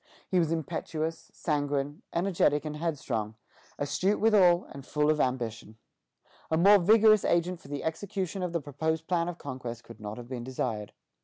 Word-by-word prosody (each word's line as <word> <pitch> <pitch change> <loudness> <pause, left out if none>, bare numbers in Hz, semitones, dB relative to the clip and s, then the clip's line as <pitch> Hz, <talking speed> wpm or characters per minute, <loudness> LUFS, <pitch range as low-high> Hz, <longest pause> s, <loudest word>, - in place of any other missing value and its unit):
He 185 - +2
was 165 -2 +1
impetuous, 160 0 -3
sanguine, 145 +1 -2
energetic, 170 -5 +1
and 150 0 -4
headstrong, 130 -9 -2 0.4
astute 185 +8 0
withal, 190 -5 +5
and 140 - -9
full 150 +3 +1
of 150 - +1
ambition. 115 -4 -2 0.7
A 160 - +2
more 200 +4 +7
vigorous 215 +2 +6
agent 175 +1 +1
for - - -15
the 145 0 -5
execution 190 +3 -3
of 180 -1 -2
the 170 -1 -1
proposed 160 +3 -2
plan 175 -1 0
of 175 - -6
conquest 125 -5 -6
could 115 - -13
not 105 +1 -6
have 120 -1 -8
been 125 -2 -5
desired. 110 -4 -3
160 Hz, 165 wpm, -29 LUFS, 135-175 Hz, 0.7 s, more